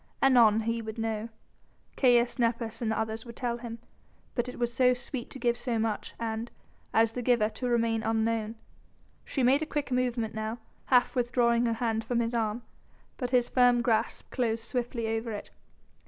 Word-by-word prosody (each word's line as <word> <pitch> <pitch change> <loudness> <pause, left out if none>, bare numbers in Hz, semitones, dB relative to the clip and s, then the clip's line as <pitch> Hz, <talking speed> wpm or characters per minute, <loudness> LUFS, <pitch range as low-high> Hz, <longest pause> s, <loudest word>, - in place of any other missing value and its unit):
Anon 235 -5 +5
he 230 +1 -1
would 220 0 -7
know. 225 0 -2 0.7
Caius 245 -1 +3
Nepos 230 -1 0
and 230 - 0
the 220 - 0
others 220 0 -2
would 235 -1 -10
tell 240 -2 -2
him, 230 -1 -6 0.6
but 245 0 -1
it - - -8
was 240 -1 -1
so 250 +1 +4
sweet 245 0 -5
to - - -6
give 240 -2 +1
so 240 -1 -2
much 220 -1 -2
and 225 0 -3 0.4
as 225 0 +3
the 250 - -3
giver 235 -3 +3
to 250 +2 -3
remain 230 -1 +1
unknown. 225 0 0 0.7
She 270 - -1
made 265 +4 +4
a - - 0
quick 295 -4 -3
movement 245 -3 0
now, 220 +1 -3 0.3
half 250 0 +3
withdrawing 240 -1 +2
her 230 - +1
hand 225 -1 -1
from 235 +2 -1
his 235 0 -1
arm, 225 0 -1 0.5
but 250 -3 -2
his 245 -1 +3
firm 245 -1 +4
grasp 230 -2 0
closed 230 -3 -1
swiftly 240 -1 -3
over 225 +1 -2
it. 205 - -7
235 Hz, 185 wpm, -29 LUFS, 225-245 Hz, 0.7 s, Anon